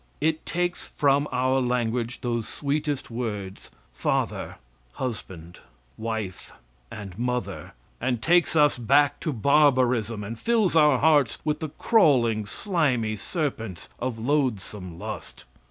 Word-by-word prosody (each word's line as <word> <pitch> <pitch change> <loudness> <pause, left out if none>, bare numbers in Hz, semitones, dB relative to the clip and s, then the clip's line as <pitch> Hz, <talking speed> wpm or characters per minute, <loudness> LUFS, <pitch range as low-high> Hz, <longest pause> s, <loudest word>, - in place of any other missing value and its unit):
It 160 0 0
takes 175 0 -2
from 140 0 +2
our 130 +1 +2
language 120 -1 -1
those 120 -2 -2
sweetest 145 -2 -2
words, 105 -5 -5 0.2
father, - - -1 0.4
husband, 90 -8 -6 0.4
wife, 110 -4 -5 0.4
and 100 -4 -8
mother, 125 0 -3 0.3
and 120 -1 0
takes 170 +5 +3
us 150 -4 +4
back 140 +4 +3
to 155 - -2
barbarism, 125 -4 +3
and 110 +3 -6
fills 225 -7 +2
our 150 -4 +6
hearts 145 -4 +3
with 150 -1 0
the 160 -2 -4
crawling, 130 - +3
slimy 125 - 0
serpents 115 - -4
of 125 -2 -3
loathsome 110 - -1
lust. 105 -2 -7
125 Hz, 120 wpm, -25 LUFS, 110-150 Hz, 0.4 s, our